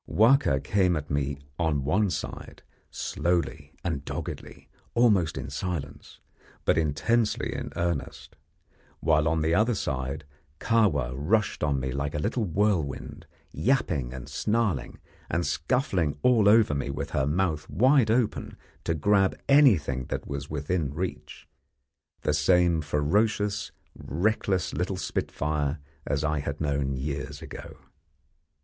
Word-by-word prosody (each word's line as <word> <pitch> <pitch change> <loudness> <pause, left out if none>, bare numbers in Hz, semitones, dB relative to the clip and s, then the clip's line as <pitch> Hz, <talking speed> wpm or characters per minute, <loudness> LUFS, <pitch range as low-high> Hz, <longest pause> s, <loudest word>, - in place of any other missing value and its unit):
Wahka 115 - +4
came 90 +4 +2
at 75 -2 -4
me 70 -1 -1 0.2
on 75 -5 +1
one 95 +9 +2
side, - - -6 0.3
slowly 85 -4 -2
and 80 -6 -2
doggedly, - - -7 0.3
almost 105 -9 +3
in - - -5
silence, 85 -6 -5 0.5
but - - +4
intensely 80 +9 +1
in - - -5
earnest, 85 -4 -3 0.6
while 75 -1 +3
on 80 0 +1
the 80 +1 +2
other 110 +5 +3
side 70 -2 -3 0.4
Kahwa 95 - +2
rushed 90 +12 0
on 70 -3 +1
me 65 0 -3
like 70 +2 -3
a - - 0
little 110 +9 -1
whirlwind, 90 -7 -1 0.2
yapping 80 - 0
and 65 -1 -8
snarling, 105 - -1 0.3
and 85 +1 0
scuffling 90 - 0
all 115 -5 +5
over 110 -7 +5
me 70 -1 -2
with 70 - -4
her 65 - +1
mouth 80 -2 0
wide 125 - +4
open 115 -1 0 0.3
to 80 - 0
grab 95 +4 +2
anything 90 - +4
that - - -4
was 70 +1 -5
within 75 0 -1
reach 75 -4 -5 0.7
the 75 - +1
same 85 +2 +3
ferocious, 100 +8 0 0.2
reckless 95 +3 -1
little 90 +1 -2
spitfire 75 -4 -2 0.3
as 70 +1 0
I 75 -1 0
had 70 0 -4
known 70 -3 0
years 70 +1 -4
ago. - - -9
80 Hz, 130 wpm, -27 LUFS, 70-105 Hz, 0.7 s, all